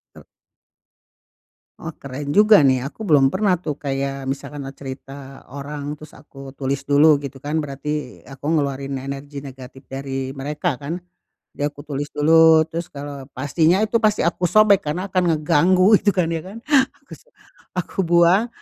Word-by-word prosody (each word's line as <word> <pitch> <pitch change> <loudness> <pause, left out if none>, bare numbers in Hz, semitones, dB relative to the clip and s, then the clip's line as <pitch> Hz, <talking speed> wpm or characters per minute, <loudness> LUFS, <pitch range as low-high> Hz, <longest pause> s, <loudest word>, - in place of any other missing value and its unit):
Tul. - - -14 1.5
Oh, 165 - -6
keren 140 +1 -6
juga, 210 -1 +6
nih, 130 -2 +4
aku 220 - -9
belum 145 -9 +4
pernah 185 +4 +1
tuh, 150 -4 -4
kayak, 135 -1 -3
misal 135 0 -6
karena 135 -2 -6
cerita 135 0 -10
orang, 145 +1 -6
terus 155 -1 -13
aku 135 -2 -12
tulis 135 0 -3
dulu, 145 +1 +5
gitu 140 -1 -7
kan. 150 +2 -1
Berarti, 150 -1 -5
aku 135 +1 -11
ngeluarin 140 -3 -1
energi 140 +1 -7
negatif 130 -1 -11
dari 135 -1 -4
mereka, 145 +2 -3
kan. 145 +4 -4 0.6
Ya 145 - 0
aku 145 0 -12
tulis 145 0 -3
dulu, 160 +1 +6
terus 170 +1 -4
kalau 140 -1 -8
pastinya 160 +7 +2
itu 220 +2 +1
pasti 215 -2 +2
aku 170 +2 -1
sobek, 215 0 +4
karena 180 +6 -2
akan 180 -3 +2
ngeganggu, 185 +7 +4
itu 205 - +2
kan, 180 -3 +1
ya 165 -1 -2
kan? 200 +4 -9 0.5
Aku - - -32
so - - -24 0.5
aku 180 - -5
buang, 175 +6 +4
145 Hz, 160 wpm, -21 LUFS, 135-170 Hz, 1.5 s, juga